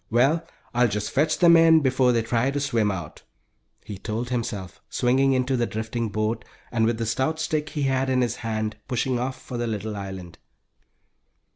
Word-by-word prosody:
Well, 135 +8 +3 0.3
I'll 120 0 +4
just 105 -1 -3
fetch 155 +3 +2
them 170 -1 +7
in 165 -1 +6
before 130 -2 +3
they 115 -2 +1
try 115 +3 +1
to 140 +1 -1
swim 115 -7 +1
out," 85 -6 -5 0.6
he 100 -3 -7
told 115 +4 -3
himself, 105 -7 -4
swinging 135 +2 +2
into 130 +1 +1
the 120 -2 0
drifting 110 +1 -3
boat, 110 +2 -1 0.3
and 115 -2 +2
with 115 -1 0
the 115 - -2
stout 130 +8 0
stick 155 -1 -1
he 150 - -3
had 135 0 +1
in 130 -1 +2
his 120 -1 -1
hand, 110 -1 -3
pushing 125 0 0
off 130 +1 -3
for 125 -2 -6
the 120 - -1
little 110 -1 -3
island. 95 -3 -7
120 Hz, 185 wpm, -25 LUFS, 110-135 Hz, 0.6 s, them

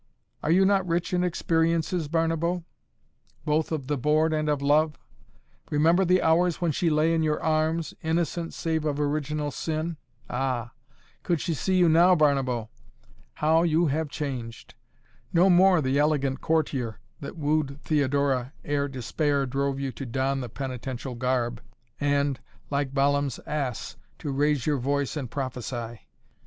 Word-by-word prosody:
Are - - -2
you 185 +4 +5
not 195 -2 +2
rich 170 +2 -1
in 180 0 +2
experiences, 165 -1 0
Barnabo, 165 +2 0 0.8
both 155 +1 +1
of 155 -5 -2
the 145 0 -2
board 155 +4 +2
and 155 -1 0
of 145 -1 +1
love? 150 +2 +2 0.7
Remember 165 +5 +3
the 180 0 +3
hours 170 +1 +3
when 170 -2 +1
she 165 +4 +1
lay 155 +1 +2
in 165 - +2
your 155 -1 +1
arms, 160 +1 0
innocent, 165 +1 -1
save 160 -2 -1
of 150 -2 -1
original 150 0 -1
sin? 160 +3 -3 0.3
Ah! 125 -2 -2 0.5
Could 170 -3 0
she 170 - -1
see 185 +5 0
you 180 -1 +5
now, 170 +3 +6
Barnabo 135 -7 +1 0.7
how 160 +2 +3
you 170 0 +3
have 155 +2 -1
changed! 130 -7 -6 0.6
No 180 +2 +5
more 180 -1 +5
the 130 +2 +1
elegant 140 -3 +1
courtier 135 -8 -1 0.2
that 140 - -8
wooed 150 -2 0
Theodora 140 -3 +1
ere 145 -1 0
despair 140 +2 -1
drove 135 +1 -1
you 135 -1 -2
to 135 - -7
don 135 +3 -1
the 125 - -5
penitential 130 0 -5
garb 120 -1 -1 0.4
and, 145 -2 +1 0.3
like 140 -1 0
Balaam's 140 -1 +1
ass, 140 -6 -3 0.2
to 145 - -4
raise 145 -1 +1
your 150 -3 +1
voice 140 +3 -1
and 135 -6 -4
prophesy! 120 -3 -5
150 Hz, 150 wpm, -26 LUFS, 135-160 Hz, 0.8 s, now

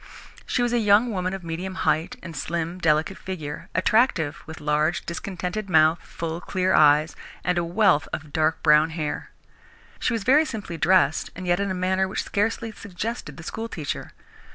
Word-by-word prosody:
She 245 - +1
was 240 0 0
a 240 - +3
young 215 +2 +4
woman 185 -2 -1
of 190 - -8
medium 175 +3 -5
height 165 +6 0
and 170 -2 -8
slim, 170 +4 -3
delicate 160 +3 +1
figure, 155 -6 -6
attractive, 185 - +2
with 160 0 -8
large, 150 +2 0
discontented 185 +3 -4
mouth, 160 -1 +4
full, 165 0 -5
clear 185 0 0
eyes 150 +1 +5 0.3
and 180 - +1
a - - 0
wealth 175 -3 +3
of 155 -2 -6
dark 160 0 +1
brown 150 +1 +5
hair. 150 -2 -3 0.7
She 235 - 0
was 225 -3 -2
very 280 +7 +5
simply 210 - -5
dressed 175 0 +3
and 185 - -7
yet 175 0 +2
in 200 0 -1
a 185 - -2
manner 185 +1 +1
which 190 - -3
scarcely 225 +2 -1
suggested 215 +3 -6
the 165 - -9
school 225 +6 -5
teacher. 150 -9 -5
180 Hz, 175 wpm, -24 LUFS, 160-200 Hz, 0.7 s, eyes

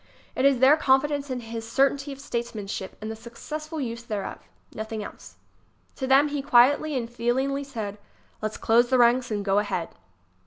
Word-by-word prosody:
It 260 - +1
is 275 -2 +5
their 265 +5 +6
confidence 285 0 +2
in 255 -1 -3
his 225 0 -7
certainty 275 +2 +2
of 275 - -8
statesmanship 220 -7 -5
and 215 +1 -4
the - - -5
successful 305 +8 -7
use 235 -4 -4
thereof. 215 -4 -5 0.3
Nothing 220 0 -5
else. - - -11 0.6
To 265 - -3
them 275 +3 +5
he 290 -1 -2
quietly 280 +3 +4
and 235 -2 -2
feelingly 250 +4 -1
said: 220 -7 -6 0.4
"Let's 215 0 -3
close 235 +2 +3
the 260 - +3
ranks 245 +1 +4
and 205 -2 -2
go 195 0 +3
ahead." 190 -5 -2
245 Hz, 170 wpm, -26 LUFS, 225-275 Hz, 0.6 s, their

